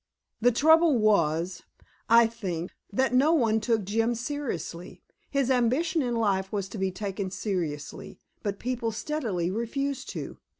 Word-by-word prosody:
The 245 +2 +4
trouble 320 +3 +5
was, 175 -5 +2 0.5
I 230 +1 +7
think, 185 -7 -4 0.2
that 260 +5 +1
no 280 +6 +4
one 225 -8 +3
took 220 -1 +1
Jim 225 +4 0
seriously. 235 - -5 0.3
His 275 -2 +1
ambition 270 +7 +2
in 245 -3 -1
life 195 -4 0
was 200 -2 -2
to 205 - -7
be 190 0 +1
taken 195 0 -4
seriously, 175 -7 -4 0.2
but 200 -2 -3
people 240 -1 -2
steadily 215 - -2
refused 270 +6 -3
to. - - -6
225 Hz, 140 wpm, -27 LUFS, 190-255 Hz, 0.5 s, I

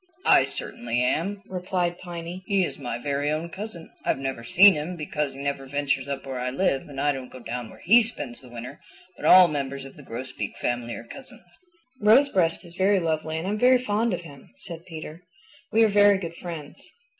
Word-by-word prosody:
"I - - +7
certainly 120 0 -3
am," 195 +10 -1
replied 180 -2 -2
Piny. 175 0 -7
"He 195 -3 +2
is - - -7
my 120 -4 -4
very 140 +3 -1
own 155 +3 -2
cousin. 190 -2 -8
I've - - +1
never 135 -3 -4
seen 190 +11 +7
him 155 +4 -4
because 150 -3 -3
he - - -10
never 140 -1 -3
ventures 140 -1 -1
up 140 -1 -4
where 130 -2 -4
I 125 +1 -1
live 135 0 0
and 135 -1 -7
I 145 +1 +3
don't 130 -2 -6
go - - -10
down 120 -1 -6
where - - -15
he 230 +7 +7
spends 215 - -6
the 125 - -14
winter, 120 +4 -8 0.4
but - - -3
all 185 -1 +9
members 140 -3 -4
of 135 - -12
the - - -12
Grosbeak 130 0 -6
family 120 -1 -2
are - - -8
cousins." 265 - -12 0.6
"Rosebreast 210 -7 +4
is 170 - -13
very 190 +2 +3
lovely 160 -1 -1
and 165 +3 -3
I'm 210 +2 -1
very 255 +2 +6
fond 230 -1 0
of 180 - -2
him," 145 -5 -13
said 170 -2 -9
Peter. 160 0 -8 0.5
"We 225 +1 +5
are - - +6
very 205 -1 +5
good 170 -3 -6
friends." 165 -5 -8
160 Hz, 205 wpm, -25 LUFS, 135-190 Hz, 0.6 s, all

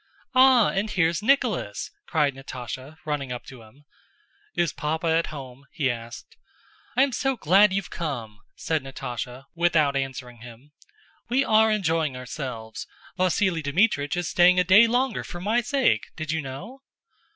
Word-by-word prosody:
"Ah, 255 -3 +6
and 200 +3 -1
here's 170 -2 +1
Nicholas!" 220 - 0 0.2
cried 150 -4 +1
Natásha, 130 +2 -8
running 145 -4 -3
up 125 - -5
to 130 -3 -12
him. 130 +7 -19 0.7
"Is 170 -3 +1
Papa 160 +2 -3
at 165 0 +2
home?" 135 -2 -10
he 140 -6 0
asked. 115 0 -9 0.6
"I 260 - +6
am 275 - +1
so 270 +2 -1
glad 195 +4 +5
you've 195 0 -3
come!" 120 -10 -5 0.2
said 160 -2 -1
Natásha, 125 -1 -6
without 165 -5 +2
answering 130 -3 -4
him. 120 +4 -14 0.6
"We 265 +3 +2
are 220 0 +4
enjoying 165 -9 0
ourselves! 125 -4 -6 0.3
Vasíli 185 -1 +1
Dmítrich 145 -1 +1
is 175 -1 -1
staying 180 +1 +5
a - - +4
day 200 +6 +7
longer 250 +3 0
for 175 - -8
my 215 +6 +1
sake! 265 +2 +1
Did 155 -1 -4
you 160 0 -1
know?" 180 - -8
160 Hz, 150 wpm, -25 LUFS, 135-200 Hz, 0.7 s, day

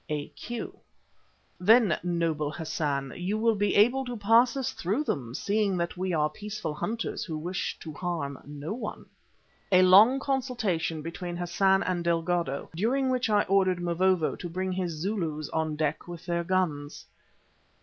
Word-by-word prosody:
A.Q.: 155 +10 -5 0.8
"Then, 210 -2 +5
noble 165 -4 -1
Hassan, 145 -4 -2
you 185 +4 -2
will 225 +1 +3
be 205 -1 0
able 245 +6 +4
to 245 -1 -5
pass 230 +5 +4
us 265 - -1
through 205 - -1
them, 125 - -3
seeing 205 0 0
that 170 0 -2
we 185 +1 -2
are 155 -3 +2
peaceful 205 0 -5
hunters 225 +9 -3
who 160 -3 -4
wish 175 +4 -3
to 155 - -7
harm 155 -5 -3
no 145 +5 -5
one." 225 -2 -6 0.7
(A 185 0 +6
long 210 +9 +7
consultation 235 - -1
between 175 +1 -5
Hassan 190 +2 +2
and 180 -2 -1
Delgado, 170 -3 -1
during 255 +8 +1
which 250 -2 0
I 210 -1 +4
ordered 185 -2 +2
Mavovo 175 -1 +1
to 175 - -6
bring 185 +2 -2
his 180 -2 -2
Zulus 160 -3 -3
on 160 -1 -1
deck 155 +1 -2
with 175 -1 -8
their 170 -1 -1
guns.) 170 -6 -1
180 Hz, 155 wpm, -28 LUFS, 160-210 Hz, 0.8 s, long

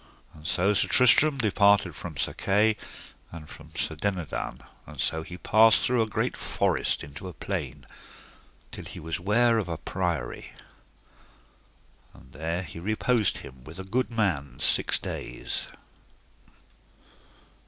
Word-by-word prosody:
And 75 0 -10
so 95 +3 +3
Sir 100 - +3
Tristram 140 +4 +6
departed 100 - +3
from 80 -3 -8
Sir - - 0
Kay, 105 +3 +2 0.6
and 80 -2 -10
from 75 0 -13
Sir 80 0 -1
Dinadan, 90 0 -4 0.2
and - - -11
so 80 - 0
he 90 +2 -9
passed 110 +4 +5
through 125 -1 +2
a 110 - +1
great 110 - -1
forest - - 0
into 75 +6 -9
a 90 - -8
plain, - - -5 0.9
till - - -8
he - - -7
was 80 +1 -4
ware 115 +5 +3
of 100 - -4
a 85 - -3
priory, 85 -8 -3 1.6
and - - -17
there 85 +3 -3
he 85 -1 -9
reposed 110 +3 +1
him 65 -1 -13
with 80 +6 -12
a 95 - -6
good 120 +7 -1
man 80 - -1
six - - +3
days. - - -5
95 Hz, 140 wpm, -27 LUFS, 80-110 Hz, 1.6 s, Tristram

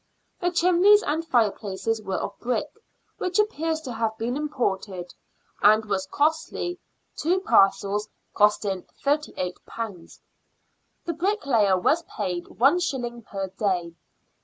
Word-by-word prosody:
The 355 - +1
chimneys 365 +4 +5
and 315 +3 -1
fireplaces 220 - 0
were 195 -2 -3
of 200 - -3
brick, 250 +4 -1 0.5
which 365 0 -1
appears 325 -7 0
to 260 -6 -6
have 225 -1 -1
been 235 +3 -2
imported, 200 -11 -2 0.5
and 215 +1 +5
was 195 -2 -2
costly, 320 - -1 0.4
two 350 +5 +1
parcels 205 - +3 0.2
costing 205 -3 +2 0.2
^^38. 220 - -3 0.9
The 340 - -1
bricklayer 280 - +2
was 305 - +2 0.2
paid 175 -1 -2
one 275 +9 +3
shilling 245 -8 -3
per 195 -3 -5
day. 185 -3 -1
230 Hz, 115 wpm, -25 LUFS, 195-320 Hz, 0.9 s, chimneys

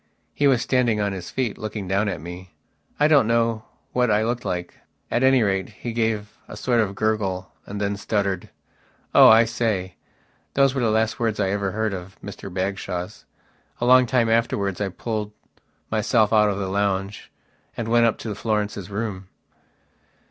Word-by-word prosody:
He 145 - +2
was 130 -4 +3
standing 120 -4 +1
on 100 -1 0
his 90 -2 -7
feet, 125 -5 -2
looking 105 -2 -5
down 100 +3 +1
at 85 - -4
me. 90 +3 -10 0.4
I 150 - +5
don't 145 -7 +5
know 115 -1 +1 0.3
what 125 -1 +2
I 105 +1 +3
looked 120 +2 -2
like. 90 -3 -4 0.3
At 120 - +1
any 130 -2 +5
rate, 95 -2 0
he 120 - -7
gave 110 -1 -2
a - - -9
sort 120 -2 +1
of 100 -2 -2
gurgle 100 -4 -1 0.2
and 100 +1 -5
then 100 0 -1
stuttered: 100 -3 -2 0.6
"Oh, - - +9
I 115 +1 +7
say...." 110 -5 -2 0.6
Those 135 -1 +4
were 135 - -1
the 115 - +2
last 110 0 +1
words 115 -3 -1
I 95 -2 +1
ever 100 -2 -1
heard 110 -1 -1
of 95 +1 -8
Mr 100 -1 -8
Bagshawe's. 95 -1 -4 0.5
A 120 - -1
long 125 0 +6
time 120 -2 +2
afterwards 105 -4 0
I 100 - 0
pulled 105 +2 -4 0.6
myself 110 0 +2
out 105 -1 +5
of 100 - -2
the 100 -1 -2
lounge 100 0 -2 0.5
and 115 - -3
went 115 0 +4
up 115 - 0
to 110 - -4
Florence's 105 -2 -2
room. 100 -2 -4
105 Hz, 175 wpm, -23 LUFS, 100-115 Hz, 0.6 s, Oh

